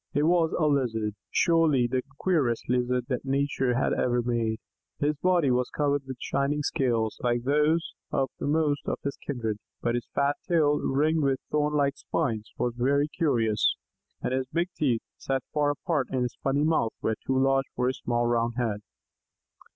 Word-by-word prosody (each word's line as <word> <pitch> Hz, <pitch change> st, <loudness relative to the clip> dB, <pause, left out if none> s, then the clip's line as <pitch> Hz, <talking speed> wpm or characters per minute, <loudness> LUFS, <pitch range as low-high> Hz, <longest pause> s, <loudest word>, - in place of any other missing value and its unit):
It 145 Hz, -, +3 dB
was 165 Hz, 0 st, +3 dB
a 155 Hz, -, +2 dB
Lizard 115 Hz, -7 st, +1 dB, 0.2 s
surely 165 Hz, -7 st, +3 dB
the 125 Hz, +1 st, 0 dB, 0.2 s
queerest 145 Hz, -11 st, +1 dB
Lizard 125 Hz, 0 st, +1 dB
that 125 Hz, -3 st, -1 dB
Nature 135 Hz, -2 st, 0 dB
had 130 Hz, -, +1 dB
ever 120 Hz, -1 st, +1 dB
made. 115 Hz, -2 st, 0 dB, 0.4 s
His 150 Hz, +1 st, +1 dB
body 175 Hz, -4 st, +2 dB
was 125 Hz, 0 st, +1 dB
covered 145 Hz, -1 st, 0 dB
with 130 Hz, -1 st, -6 dB
shining 145 Hz, +2 st, -1 dB
scales, 115 Hz, -6 st, 0 dB
like 120 Hz, -1 st, 0 dB
those 150 Hz, +4 st, +2 dB, 0.2 s
of 135 Hz, -2 st, 0 dB
most 145 Hz, -1 st, 0 dB
of -, -, -1 dB
his 140 Hz, -, -2 dB
kindred, 115 Hz, -6 st, -3 dB, 0.2 s
but 120 Hz, -, 0 dB
his 120 Hz, 0 st, -2 dB
fat 140 Hz, +1 st, +2 dB
tail, 150 Hz, -4 st, +3 dB
ringed 155 Hz, +4 st, +1 dB
with 135 Hz, -2 st, +1 dB
thorn 150 Hz, 0 st, +1 dB
like 140 Hz, -1 st, +1 dB
spines, 115 Hz, -9 st, -2 dB
was 120 Hz, -1 st, 0 dB
very 140 Hz, +4 st, +2 dB
curious, 115 Hz, -10 st, +1 dB, 0.5 s
and -, -, -1 dB
his 130 Hz, 0 st, -1 dB
big 170 Hz, +2 st, 0 dB
teeth, 125 Hz, -7 st, +1 dB
set 135 Hz, -1 st, -2 dB
far 150 Hz, -1 st, +2 dB
apart 145 Hz, -1 st, -1 dB
in 130 Hz, -1 st, 0 dB
his 125 Hz, -, -3 dB
funny 140 Hz, +2 st, +1 dB
mouth, 155 Hz, -8 st, +1 dB
were 110 Hz, -, +1 dB
too 130 Hz, -, +2 dB
large 135 Hz, 0 st, +3 dB
for 125 Hz, -, 0 dB
his 130 Hz, 0 st, -1 dB
small 120 Hz, 0 st, 0 dB
round 120 Hz, 0 st, +1 dB
head. 110 Hz, -4 st, -1 dB
135 Hz, 175 wpm, -27 LUFS, 120-150 Hz, 0.5 s, It